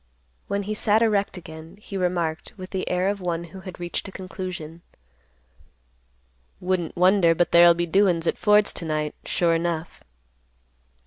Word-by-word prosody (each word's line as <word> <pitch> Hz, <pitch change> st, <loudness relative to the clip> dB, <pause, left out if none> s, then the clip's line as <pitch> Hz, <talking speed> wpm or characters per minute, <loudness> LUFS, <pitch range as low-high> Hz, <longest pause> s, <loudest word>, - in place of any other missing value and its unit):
When 200 Hz, 0 st, -2 dB
he 210 Hz, +2 st, -3 dB
sat 215 Hz, +1 st, +2 dB
erect 205 Hz, -3 st, +1 dB
again, 160 Hz, +1 st, -11 dB
he 210 Hz, -, -9 dB
remarked, 175 Hz, -4 st, -2 dB
with 185 Hz, -1 st, -9 dB
the 190 Hz, -1 st, -3 dB
air 180 Hz, +1 st, +1 dB
of 200 Hz, 0 st, -1 dB
one 170 Hz, -1 st, -2 dB
who 170 Hz, +3 st, -11 dB
had 185 Hz, -1 st, -10 dB
reached 175 Hz, +3 st, -4 dB
a -, -, -8 dB
conclusion, 185 Hz, -4 st, -7 dB, 1.8 s
"Wouldn't 180 Hz, -3 st, -2 dB
wonder 180 Hz, -2 st, +4 dB
but 175 Hz, +1 st, +1 dB
there'll 170 Hz, 0 st, +7 dB
be 175 Hz, 0 st, -1 dB
doin's 175 Hz, -1 st, +2 dB
at -, -, -1 dB
Ford's 210 Hz, 0 st, +4 dB
to 170 Hz, -, -4 dB
night, 155 Hz, -1 st, -2 dB
sure 170 Hz, -1 st, +1 dB
enough." 165 Hz, -1 st, -3 dB
180 Hz, 155 wpm, -24 LUFS, 170-195 Hz, 1.8 s, there'll